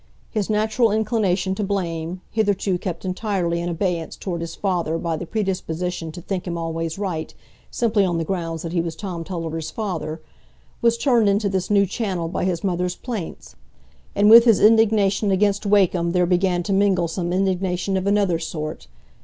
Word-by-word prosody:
His 215 Hz, -3 st, -2 dB
natural 220 Hz, +2 st, +2 dB
inclination 210 Hz, -4 st, +1 dB
to 205 Hz, -, -3 dB
blame, 180 Hz, -3 st, -3 dB
hitherto 200 Hz, -4 st, 0 dB
kept 180 Hz, 0 st, -5 dB
entirely 185 Hz, -3 st, -1 dB
in 175 Hz, -, -2 dB
abeyance 170 Hz, -1 st, -2 dB
toward 175 Hz, -3 st, -4 dB
his 165 Hz, 0 st, -5 dB
father 175 Hz, -5 st, -1 dB
by 165 Hz, -1 st, -2 dB
the 165 Hz, +2 st, -6 dB
predisposition 180 Hz, -5 st, -3 dB
to 175 Hz, -, -8 dB
think 190 Hz, -1 st, -4 dB
him 170 Hz, -1 st, -3 dB
always 165 Hz, 0 st, -3 dB
right, 180 Hz, -6 st, -3 dB, 0.4 s
simply 220 Hz, -4 st, +1 dB
on 175 Hz, -3 st, 0 dB
the 165 Hz, -, 0 dB
ground 165 Hz, -2 st, -3 dB
that 165 Hz, 0 st, -5 dB
he 170 Hz, -, +2 dB
was 165 Hz, -1 st, -4 dB
Tom 175 Hz, -3 st, -5 dB
Tulliver's 165 Hz, -3 st, -4 dB
father, 170 Hz, -7 st, -4 dB, 0.6 s
was 235 Hz, 0 st, +3 dB
turned 235 Hz, -5 st, +3 dB
into 200 Hz, +1 st, +1 dB
this 190 Hz, -1 st, -2 dB
new 200 Hz, -1 st, +4 dB
channel 190 Hz, -4 st, -2 dB
by 180 Hz, -, -2 dB
his 180 Hz, -1 st, -1 dB
mother's 180 Hz, -1 st, -1 dB
plaints; 225 Hz, -9 st, -6 dB, 0.6 s
and 205 Hz, +1 st, +4 dB
with 230 Hz, +2 st, +9 dB
his 230 Hz, -4 st, +5 dB
indignation 215 Hz, -2 st, +4 dB
against 200 Hz, +1 st, +1 dB
Wakem 185 Hz, -4 st, +3 dB
there 180 Hz, -1 st, +3 dB
began 180 Hz, 0 st, +1 dB
to 200 Hz, -, -1 dB
mingle 195 Hz, -3 st, +2 dB
some 175 Hz, +1 st, -3 dB
indignation 185 Hz, 0 st, 0 dB
of 190 Hz, +1 st, -1 dB
another 200 Hz, -4 st, +2 dB
sort. 155 Hz, -, -5 dB
185 Hz, 175 wpm, -22 LUFS, 170-205 Hz, 0.6 s, with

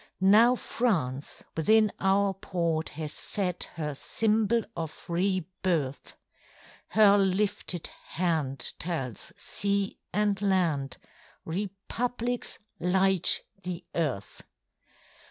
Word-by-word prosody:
Now 235 Hz, +4 st, +7 dB
France 155 Hz, -, -1 dB
within 215 Hz, +6 st, +4 dB
our 195 Hz, 0 st, +3 dB
port 170 Hz, -4 st, -1 dB
has 155 Hz, -2 st, -4 dB
set 180 Hz, -4 st, -1 dB
Her 150 Hz, -3 st, -3 dB
symbol 220 Hz, -, +1 dB
of 160 Hz, -2 st, -6 dB
re 185 Hz, +1 st, +1 dB, 0.2 s
birth; 150 Hz, -7 st, -1 dB, 0.7 s
Her 205 Hz, -1 st, +6 dB
lifted 190 Hz, -2 st, +1 dB, 0.2 s
hand 160 Hz, -6 st, -1 dB
tells 135 Hz, -, -2 dB
sea 200 Hz, 0 st, 0 dB
and 205 Hz, -1 st, +1 dB
land 165 Hz, -9 st, +1 dB, 0.5 s
Republics 225 Hz, +7 st, -3 dB, 0.2 s
light 190 Hz, 0 st, +3 dB, 0.2 s
the 180 Hz, -2 st, -5 dB
earth. 140 Hz, -, -2 dB
185 Hz, 90 wpm, -28 LUFS, 160-205 Hz, 0.7 s, Now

